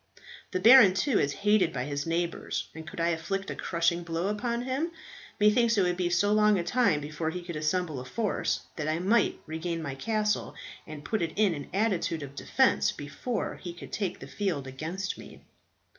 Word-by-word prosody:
The 185 Hz, -, -2 dB
baron, 225 Hz, -2 st, +8 dB
too, 250 Hz, +2 st, +2 dB
is 140 Hz, -, +1 dB
hated 205 Hz, -5 st, +4 dB
by 125 Hz, -4 st, -3 dB
his 145 Hz, +1 st, -3 dB
neighbours, 170 Hz, +1 st, -2 dB
and 160 Hz, -1 st, -9 dB
could 170 Hz, -, -8 dB
I 170 Hz, 0 st, +2 dB
inflict 180 Hz, +4 st, -2 dB
a -, -, -5 dB
crushing 170 Hz, 0 st, 0 dB
blow 170 Hz, +2 st, -2 dB
upon 235 Hz, +3 st, -2 dB
him, 265 Hz, +6 st, -1 dB, 0.5 s
methinks 230 Hz, +2 st, +4 dB
it 195 Hz, -, +4 dB
would 180 Hz, -1 st, +1 dB
be 175 Hz, -1 st, 0 dB
so 200 Hz, +4 st, +2 dB
long 210 Hz, -1 st, +4 dB
a 175 Hz, -, -1 dB
time 200 Hz, -8 st, +2 dB
before 150 Hz, +2 st, -3 dB
he 180 Hz, +2 st, -5 dB
could 170 Hz, -1 st, -6 dB
assemble 155 Hz, -1 st, -1 dB
a -, -, -6 dB
force, 210 Hz, -, -1 dB, 0.2 s
that 155 Hz, -2 st, -2 dB
I 155 Hz, +1 st, +1 dB
might 200 Hz, +6 st, +2 dB
regain 165 Hz, +1 st, -3 dB
my 145 Hz, -4 st, -4 dB
castle 210 Hz, +7 st, -1 dB, 0.3 s
and 155 Hz, -2 st, -9 dB
put 220 Hz, -, -1 dB
it 165 Hz, -1 st, -2 dB
in 205 Hz, -4 st, +3 dB
an 145 Hz, -3 st, -7 dB
attitude 185 Hz, -6 st, 0 dB
of 140 Hz, -1 st, -8 dB
defence 70 Hz, -, +2 dB
before 150 Hz, -, -4 dB
he 175 Hz, -, -6 dB
could -, -, -10 dB
take 190 Hz, -4 st, -2 dB
the -, -, -8 dB
field 185 Hz, -10 st, -2 dB
against 160 Hz, +9 st, -4 dB
me." -, -, -12 dB
175 Hz, 200 wpm, -28 LUFS, 160-210 Hz, 0.5 s, baron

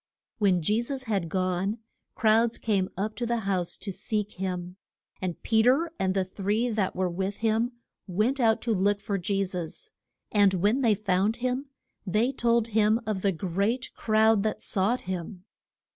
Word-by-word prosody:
When 185 Hz, -5 st, +3 dB
Je 210 Hz, +7 st, +2 dB
sus 265 Hz, +2 st, -4 dB
had 200 Hz, -8 st, -1 dB
gone, 185 Hz, +3 st, 0 dB, 0.4 s
crowds 225 Hz, +1 st, +3 dB
came 195 Hz, -4 st, 0 dB
up 215 Hz, +3 st, -2 dB
to 240 Hz, -, -1 dB
the 235 Hz, -1 st, 0 dB
house 190 Hz, -4 st, -1 dB
to 200 Hz, -, -6 dB
seek 210 Hz, +2 st, -2 dB
him. 180 Hz, -1 st, -4 dB, 0.4 s
And 180 Hz, -3 st, -3 dB
Pe 220 Hz, -1 st, +3 dB
ter, 275 Hz, +8 st, +3 dB
and 190 Hz, 0 st, 0 dB
the 190 Hz, -1 st, +1 dB
three 205 Hz, +5 st, -1 dB
that 210 Hz, -4 st, -1 dB
were 185 Hz, 0 st, +1 dB
with 190 Hz, +3 st, -3 dB
him, 225 Hz, +3 st, +1 dB, 0.3 s
went 215 Hz, +9 st, 0 dB
out 225 Hz, -3 st, +3 dB
to 235 Hz, -, +1 dB
look 200 Hz, +1 st, +2 dB
for 205 Hz, -1 st, -2 dB
Je 195 Hz, +2 st, 0 dB
sus. 180 Hz, -, -6 dB, 0.4 s
And 200 Hz, -2 st, +4 dB
when 205 Hz, +9 st, +2 dB
they 225 Hz, -5 st, +4 dB
found 200 Hz, +1 st, +1 dB
him 255 Hz, +3 st, -2 dB, 0.4 s
they 215 Hz, +6 st, +1 dB
told 235 Hz, -3 st, +1 dB
him 215 Hz, +1 st, +3 dB
of 210 Hz, -3 st, -2 dB
the 200 Hz, -, +2 dB
great 200 Hz, +9 st, -1 dB
crowd 220 Hz, -1 st, +3 dB
that 215 Hz, +1 st, -1 dB
sought 215 Hz, +5 st, 0 dB
him. 180 Hz, 0 st, -5 dB
210 Hz, 175 wpm, -27 LUFS, 190-230 Hz, 0.4 s, And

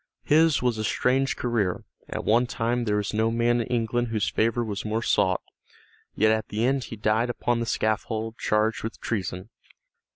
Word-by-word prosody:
His 155 Hz, -2 st, +4 dB
was 120 Hz, -3 st, +1 dB
a -, -, -1 dB
strange 130 Hz, +5 st, +1 dB
career; 110 Hz, -7 st, -1 dB, 0.3 s
at -, -, -4 dB
one 120 Hz, +3 st, +3 dB
time 120 Hz, +1 st, -1 dB
there 105 Hz, -1 st, +1 dB
was 105 Hz, 0 st, -1 dB
no 110 Hz, +1 st, +2 dB
man 120 Hz, +1 st, +2 dB
in 115 Hz, -, -4 dB
England 120 Hz, 0 st, 0 dB
whose 110 Hz, -2 st, -1 dB
favor 115 Hz, +2 st, +1 dB
was 105 Hz, 0 st, -4 dB
more 110 Hz, +1 st, -2 dB
sought, 95 Hz, -5 st, +2 dB, 0.7 s
yet 110 Hz, +1 st, +4 dB
at 110 Hz, 0 st, 0 dB
the 110 Hz, +3 st, 0 dB
end 135 Hz, 0 st, +1 dB
he -, -, -7 dB
died 110 Hz, +3 st, +1 dB
upon 120 Hz, 0 st, 0 dB
the 115 Hz, -, -2 dB
scaffold 110 Hz, +1 st, -1 dB
charged 110 Hz, +1 st, +1 dB
with 115 Hz, -, -6 dB
treason. 95 Hz, -2 st, -3 dB
115 Hz, 185 wpm, -26 LUFS, 110-120 Hz, 0.7 s, His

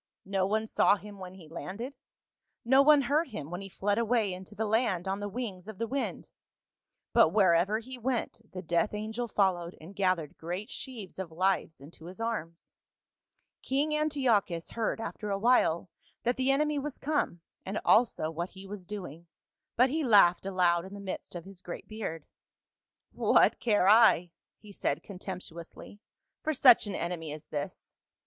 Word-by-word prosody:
No 190 Hz, -1 st, 0 dB
one 220 Hz, +2 st, 0 dB
saw 210 Hz, -, +4 dB
him 205 Hz, -1 st, -11 dB
when 185 Hz, 0 st, -8 dB
he 175 Hz, -4 st, -13 dB
landed, 200 Hz, -, -6 dB, 0.7 s
no 265 Hz, +3 st, +6 dB
one 295 Hz, 0 st, +6 dB
heard 300 Hz, +6 st, +1 dB
him 160 Hz, -, -7 dB
when 175 Hz, +2 st, -4 dB
he 195 Hz, -, -8 dB
fled 205 Hz, +3 st, 0 dB
away 225 Hz, -4 st, +1 dB
into 190 Hz, +3 st, -10 dB
the 220 Hz, -, -1 dB
land 210 Hz, -5 st, +1 dB
on 195 Hz, +1 st, -1 dB
the 205 Hz, 0 st, -4 dB
wings 200 Hz, -5 st, -5 dB
of 220 Hz, -3 st, -8 dB
the 230 Hz, -, -1 dB
wind, 270 Hz, +4 st, -4 dB, 0.8 s
but 230 Hz, -8 st, +6 dB
wherever 185 Hz, +1 st, +3 dB
he 250 Hz, +3 st, -8 dB
went 240 Hz, -1 st, -2 dB
the 185 Hz, 0 st, -7 dB
death 170 Hz, +5 st, 0 dB
angel 220 Hz, +3 st, -3 dB
followed 185 Hz, -5 st, 0 dB
and 170 Hz, +5 st, -12 dB
gathered 185 Hz, -6 st, 0 dB
great 180 Hz, +7 st, -5 dB
sheaves 230 Hz, -9 st, -7 dB
of 180 Hz, -3 st, -5 dB
lives 180 Hz, -2 st, 0 dB
into 155 Hz, +3 st, -14 dB
his 185 Hz, +4 st, -10 dB
arms. 185 Hz, -8 st, -4 dB, 0.4 s
" -, -, -53 dB
King 290 Hz, +3 st, 0 dB
Antiochus 250 Hz, -, +1 dB
heard 230 Hz, -1 st, -1 dB
after 215 Hz, -1 st, -5 dB
a 200 Hz, -, 0 dB
while 195 Hz, -6 st, +3 dB, 0.4 s
that 245 Hz, +1 st, +1 dB
the 260 Hz, +1 st, 0 dB
enemy 295 Hz, +2 st, +2 dB
was 285 Hz, 0 st, -5 dB
come, 290 Hz, -, -1 dB, 0.2 s
and 195 Hz, +3 st, -3 dB
also 215 Hz, -9 st, +3 dB
what 170 Hz, +3 st, -4 dB
he 190 Hz, 0 st, -12 dB
was 195 Hz, -2 st, -8 dB
doing, 175 Hz, -5 st, -7 dB, 0.5 s
but 250 Hz, +2 st, +4 dB
he 315 Hz, +1 st, 0 dB
laughed 195 Hz, -7 st, +5 dB
aloud 175 Hz, -3 st, +2 dB
in 190 Hz, +2 st, -9 dB
the -, -, -8 dB
midst 190 Hz, -2 st, -6 dB
of 170 Hz, -, -6 dB
his 195 Hz, -2 st, -13 dB
great 175 Hz, -, -8 dB
beard. 195 Hz, -8 st, -5 dB, 0.9 s
"'What -, -, +3 dB
care 210 Hz, -5 st, +2 dB
I,' 205 Hz, -5 st, +6 dB, 0.3 s
he 210 Hz, -1 st, -14 dB
said 150 Hz, -6 st, -2 dB
contemptuously, 180 Hz, -1 st, -8 dB, 0.4 s
'for 310 Hz, -1 st, -1 dB
such 250 Hz, -5 st, +7 dB
an 200 Hz, -, -4 dB
enemy 170 Hz, -3 st, -3 dB
as 155 Hz, +1 st, -8 dB
this 145 Hz, -1 st, -6 dB
200 Hz, 175 wpm, -30 LUFS, 175-235 Hz, 0.9 s, such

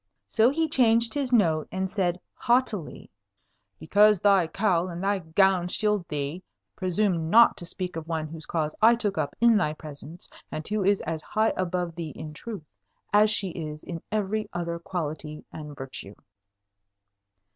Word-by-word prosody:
So 220 Hz, -, +4 dB
he 320 Hz, +4 st, 0 dB
changed 230 Hz, -5 st, +3 dB
his 275 Hz, -3 st, -1 dB
note, 165 Hz, -10 st, +3 dB
and 190 Hz, 0 st, -1 dB
said 185 Hz, -2 st, -1 dB
haughtily, 240 Hz, -, -1 dB, 0.7 s
"Because 205 Hz, +5 st, +4 dB
thy 195 Hz, -3 st, +4 dB
cowl 185 Hz, -2 st, +1 dB
and 175 Hz, +1 st, -6 dB
thy 200 Hz, 0 st, +1 dB
gown 180 Hz, +2 st, +2 dB
shield 210 Hz, -1 st, 0 dB
thee, 150 Hz, +3 st, -3 dB, 0.3 s
presume 185 Hz, -3 st, 0 dB
not 235 Hz, +5 st, +7 dB
to 175 Hz, -, -6 dB
speak 180 Hz, 0 st, -5 dB
of 165 Hz, -1 st, -6 dB
one 160 Hz, -2 st, -2 dB
whose 160 Hz, 0 st, -9 dB
cause 155 Hz, -2 st, -1 dB
I 230 Hz, +2 st, +7 dB
took 205 Hz, -6 st, -2 dB
up 145 Hz, -2 st, -2 dB
in 235 Hz, -2 st, +5 dB
thy 150 Hz, -7 st, +1 dB
presence, 155 Hz, +2 st, -10 dB, 0.2 s
and 155 Hz, -, -5 dB
who 210 Hz, -1 st, -1 dB
is 200 Hz, +1 st, +3 dB
as 160 Hz, -1 st, -4 dB
high 215 Hz, +7 st, +1 dB
above 180 Hz, -2 st, -2 dB
thee 160 Hz, -2 st, -6 dB
in 155 Hz, -1 st, -7 dB
truth 205 Hz, +1 st, -7 dB, 0.5 s
as 210 Hz, +1 st, +6 dB
she 205 Hz, -2 st, 0 dB
is 155 Hz, -3 st, -6 dB
in 170 Hz, -2 st, -6 dB
every 215 Hz, 0 st, -1 dB
other 170 Hz, -1 st, -3 dB
quality 155 Hz, -3 st, -5 dB
and 150 Hz, -2 st, -8 dB
virtue." 130 Hz, -7 st, -8 dB
180 Hz, 165 wpm, -26 LUFS, 160-210 Hz, 0.7 s, not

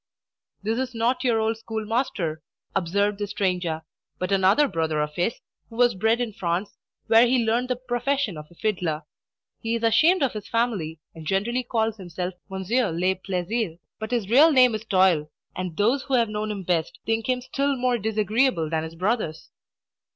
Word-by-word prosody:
"This 220 Hz, +3 st, 0 dB
is 255 Hz, -2 st, -3 dB
not 235 Hz, +4 st, +1 dB
your 235 Hz, -3 st, +2 dB
old 220 Hz, 0 st, 0 dB
schoolmaster," 220 Hz, -, -2 dB, 0.3 s
observed 200 Hz, +3 st, +1 dB
the 205 Hz, -, -2 dB
stranger, 180 Hz, -5 st, -1 dB, 0.3 s
"but 185 Hz, +2 st, -3 dB
another 195 Hz, +9 st, +4 dB
brother 160 Hz, -, -1 dB
of 150 Hz, 0 st, -1 dB
his, 175 Hz, +8 st, -1 dB, 0.3 s
who 225 Hz, -, -12 dB
was 240 Hz, 0 st, +4 dB
bred 220 Hz, +4 st, +2 dB
in 235 Hz, -3 st, -2 dB
France, 185 Hz, 0 st, -2 dB, 0.3 s
where 230 Hz, +2 st, +6 dB
he 245 Hz, -1 st, +2 dB
learned 235 Hz, +3 st, +1 dB
the 250 Hz, -, 0 dB
profession 245 Hz, -2 st, -1 dB
of 150 Hz, 0 st, -9 dB
a 175 Hz, -, -19 dB
fiddler. 170 Hz, -6 st, -1 dB, 0.6 s
He 230 Hz, 0 st, -1 dB
is 230 Hz, -, -3 dB
ashamed 310 Hz, +9 st, +4 dB
of 270 Hz, -, +1 dB
his 210 Hz, -2 st, -6 dB
family, 220 Hz, -9 st, -1 dB, 0.2 s
and 160 Hz, -2 st, -10 dB
generally 220 Hz, +7 st, 0 dB
calls 225 Hz, -2 st, -1 dB
himself 180 Hz, -1 st, -5 dB, 0.2 s
Monsieur 195 Hz, +4 st, 0 dB
le 180 Hz, +3 st, +1 dB
Plaisir; 185 Hz, 0 st, -2 dB, 0.2 s
but 220 Hz, 0 st, -4 dB
his 235 Hz, -5 st, -1 dB
real 285 Hz, +9 st, +6 dB
name 255 Hz, -4 st, +6 dB
is 215 Hz, +1 st, -4 dB
Toil, 185 Hz, -7 st, +3 dB, 0.3 s
and 180 Hz, -3 st, -4 dB
those 235 Hz, +7 st, +2 dB
who 270 Hz, -1 st, -1 dB
have 235 Hz, -3 st, +3 dB
known 210 Hz, 0 st, -3 dB
him 200 Hz, -2 st, -4 dB
best 170 Hz, -2 st, -1 dB
think 225 Hz, +2 st, -1 dB
him 255 Hz, -1 st, +2 dB
still 280 Hz, +2 st, -1 dB
more 250 Hz, -1 st, +1 dB
disagreeable 215 Hz, -, +1 dB
than 160 Hz, -1 st, +1 dB
his 160 Hz, +1 st, -7 dB
brothers." 185 Hz, -4 st, -2 dB
215 Hz, 180 wpm, -25 LUFS, 180-240 Hz, 0.6 s, where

